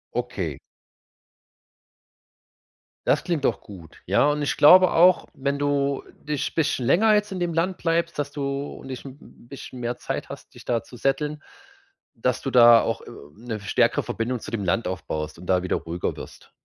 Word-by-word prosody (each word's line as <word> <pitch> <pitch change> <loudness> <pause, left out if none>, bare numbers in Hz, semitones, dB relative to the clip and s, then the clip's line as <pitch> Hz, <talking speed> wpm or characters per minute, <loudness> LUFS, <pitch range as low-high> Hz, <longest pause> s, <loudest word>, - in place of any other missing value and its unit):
Okay. - - -3 2.5
Das - - +3
klingt 170 -6 -1
doch - - +1
gut. 85 -6 -14
Ja, 100 +9 +3
und 150 0 -1
ich 145 - -1
glaube 185 +4 +7
auch, 180 +2 +5
wenn 140 +1 -2
du 140 -1 0 0.2
dich 150 -2 -3
bisschen 145 -6 0
länger 215 - +4
jetzt 210 -1 +1
in 185 - -4
dem 175 -1 -1
Land 175 +3 0
bleibst, 170 0 -1
dass 145 -1 -2
du 145 - -6 0.3
und - - -11
dich 130 -2 -7
'n 135 -1 -10
b - - -17
b - - -18
bisschen 130 -2 -9
mehr 120 0 -3
Zeit - - -5
hast, - - -10
dich - - -13
da 115 -3 -1
zu 125 - -14
settlen, 150 +4 -1 0.7
dass 125 +1 -1
du 135 - -3
da 120 -2 +8
auch, - - -2
äh, - - -12 0.3
'ne 115 0 -6
stärkere 100 -1 +1
Verbindung 120 +2 -3
zu - - -9
dem 110 -3 -2
Land 95 +6 0
aufbaust 80 -4 -4
und 90 - -11
da 90 -1 +2
wieder 90 - 0
ruhiger 85 +1 -4
wirst. - - -11
135 Hz, 185 wpm, -24 LUFS, 115-155 Hz, 2.5 s, da